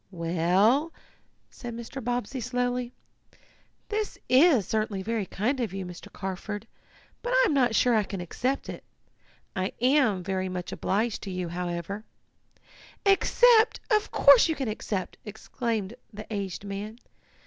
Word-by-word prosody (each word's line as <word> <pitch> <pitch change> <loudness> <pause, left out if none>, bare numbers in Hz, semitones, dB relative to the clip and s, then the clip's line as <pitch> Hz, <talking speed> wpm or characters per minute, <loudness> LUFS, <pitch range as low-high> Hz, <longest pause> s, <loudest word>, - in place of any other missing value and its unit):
"Well," 185 - +2 0.6
said 240 -2 -7
Mr. 235 +3 -7
Bobbsey 245 +2 -2
slowly, 245 0 -1 1.0
"this 425 -1 -2
is 260 - +5
certainly 215 -2 -1
very 220 -2 -2
kind 245 +10 -1
of, 225 -6 -2
you, 195 -1 -4
Mr. 180 -1 -10
Carford, 200 +3 -5 0.6
but 485 - -4
I - - +5
am 385 - +2
not 250 -5 +3
sure 245 +2 +4
I 220 - +4
can 195 -1 -5
accept 250 +10 -2
it. - - -7 0.7
I 185 +1 -1
am 250 -7 +3
very 190 0 -2
much 180 -1 -5
obliged 215 +3 -1
to 200 - -6
you, 180 -2 -3
however 175 +3 -4 0.5
" - - -24
"Accept! 480 -2 +4
Of 425 0 +3
course 280 +2 +6
you 320 - +1
can 270 -4 -3
accept!" 210 -3 -3
exclaimed 220 -1 -3 0.2
the 215 0 -8
aged 195 -2 -4
man. 205 +3 -5
220 Hz, 145 wpm, -27 LUFS, 190-250 Hz, 1.0 s, course